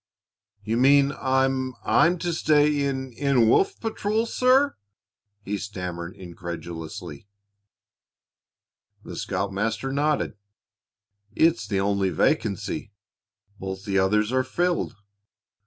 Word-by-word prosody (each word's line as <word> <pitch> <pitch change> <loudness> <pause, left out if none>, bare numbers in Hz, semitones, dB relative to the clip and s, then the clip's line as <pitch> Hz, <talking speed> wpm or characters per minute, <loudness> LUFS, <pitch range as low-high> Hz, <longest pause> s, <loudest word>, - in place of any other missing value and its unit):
"You 110 +3 -1
mean 140 +2 +5
I 130 -1 +1 0.4
I'm 175 +2 +4
to 175 0 -2
stay 150 -2 +3
in 130 -2 -4
in 130 -2 +2
Wolf 390 - +3
patrol, 220 0 -1
sir?" 255 +4 +3 0.7
he 105 0 -3
stammered 90 -3 -6
incredulously. 85 -2 -8 1.8
The - - -8
scoutmaster 105 +7 -2
nodded. 150 +2 0 1.0
"It's 140 -11 +3
the 100 -2 0
only 100 -1 +1
vacancy. 90 +4 -1 0.7
Both 95 +1 -6
the 100 -2 +1
others 105 +3 +2
are 130 0 +2
filled. 175 +7 -1
115 Hz, 100 wpm, -25 LUFS, 95-150 Hz, 1.8 s, mean